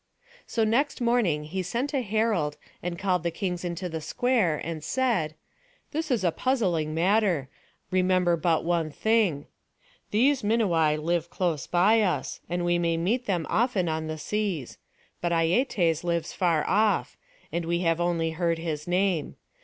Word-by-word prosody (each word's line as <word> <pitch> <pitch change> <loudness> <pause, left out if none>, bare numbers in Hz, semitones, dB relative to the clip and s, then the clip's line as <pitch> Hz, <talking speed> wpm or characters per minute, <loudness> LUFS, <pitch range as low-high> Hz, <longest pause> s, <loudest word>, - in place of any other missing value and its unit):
So 225 - 0
next 240 +8 +1
morning 235 -11 +1
he 180 +5 -3
sent 235 - -2
a 275 - +1
herald, 210 -9 0 0.2
and 175 0 -4
called 185 -2 0
the 170 - -1
kings 180 0 -3
into 175 +1 -3
the 160 -2 -5
square, 195 -2 +1
and 160 -1 -5
said: 220 - 0 0.6
"This 315 +1 -2
is 240 -7 +1
a 175 - +3
puzzling 175 - 0
matter; 180 -5 +2 0.4
remember 185 -1 +3
but 165 0 +1
one 170 -2 +1
thing. 200 -5 +1 0.6
These 260 +6 +3
Minuai 175 -9 +2
live 170 +1 -1
close 165 -7 -1
by 205 +6 +4
us, 190 -4 -1
and 175 0 -1
we 175 0 +2
may 170 -1 +1
meet 230 +9 0
them 175 -5 0
often 220 -6 +1
on 160 0 -2
the 155 0 -4
seas; 185 - -3 0.4
but 175 - 0
Aietes 170 - +2
lives 170 -2 -1
afar 170 -4 +1
off, 210 +2 +2 0.4
and 170 -1 -2
we 170 +1 0
have 165 -1 +1
only 170 -2 0
heard 165 0 0
his 160 -2 -4
name. 180 -3 0
175 Hz, 160 wpm, -27 LUFS, 165-215 Hz, 0.6 s, by